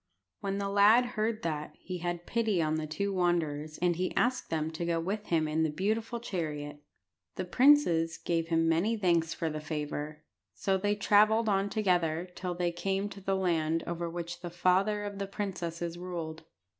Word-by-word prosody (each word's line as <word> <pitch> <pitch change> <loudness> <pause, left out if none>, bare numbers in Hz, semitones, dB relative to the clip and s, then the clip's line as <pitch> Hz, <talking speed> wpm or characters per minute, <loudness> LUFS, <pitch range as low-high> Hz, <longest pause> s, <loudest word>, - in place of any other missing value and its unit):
When 195 0 -2
the 200 0 -1
lad 205 +5 +6
heard 215 0 -1
that, 150 -2 -3
he 180 -1 -6
had 175 0 -3
pity 220 -5 +1
on 155 -1 +1
the 155 0 -3
two 200 +6 -2
wanderers, 155 -4 0
and 175 -1 +3
he 185 +1 -2
asked 250 +1 +1
them 160 -1 -1
to 165 +2 -4
go 170 -1 0
with 200 +5 -3
him 160 -2 +2
in 155 +1 0
the 160 - +2
beautiful 220 +8 -1
chariot. 150 -9 -4 0.5
The 185 - -3
princes 175 - +4
gave 165 0 -1
him 165 -1 +2
many 180 +8 +2
thanks 170 -5 +2
for 165 - -2
the 155 -1 -3
favour. 150 0 -4 0.3
So 195 - +1
they 205 +2 +1
travelled 215 +2 +4
on 200 -1 +2
together 175 -5 +1
till 180 -1 -4
they 175 0 0
came 195 +3 -1
to 195 - -10
the 195 0 0
land 165 -3 +1
over 170 0 -3
which 170 +1 -6
the 175 - -5
father 185 +4 +2
of 205 -1 -5
the 200 - -2
princesses 175 -4 -4
ruled. 165 -3 -5
175 Hz, 185 wpm, -30 LUFS, 165-200 Hz, 0.5 s, lad